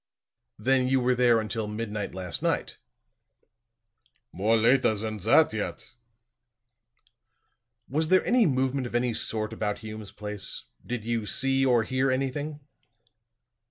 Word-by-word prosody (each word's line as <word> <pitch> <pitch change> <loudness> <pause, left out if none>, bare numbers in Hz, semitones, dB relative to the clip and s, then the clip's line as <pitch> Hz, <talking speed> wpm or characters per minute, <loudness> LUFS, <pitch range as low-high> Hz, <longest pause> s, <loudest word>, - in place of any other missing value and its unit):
"Then 130 0 +2
you 130 0 +3
were 125 0 +2
there 120 -2 +4
until 110 0 -3
midnight 105 -2 -4
last 90 -2 -4
night?" - - -1 1.5
"More 105 +5 +2
later 120 0 +4
than 110 0 -4
that 120 - +4
yet." 110 -1 -5 1.9
"Was 155 +4 0
there 185 +2 +4
any 245 -3 +4
movement 130 -1 0
of 120 - -7
any 120 0 +1
sort 110 -1 -2
about 105 -1 -2
Hume's 110 -1 -7
place? 105 -2 -6 0.2
Did 120 -3 -5
you 115 -2 -1
see 135 +2 +1
or 125 -4 +4
hear 130 +3 0
anything?" 145 +3 -2
120 Hz, 125 wpm, -27 LUFS, 110-135 Hz, 1.9 s, there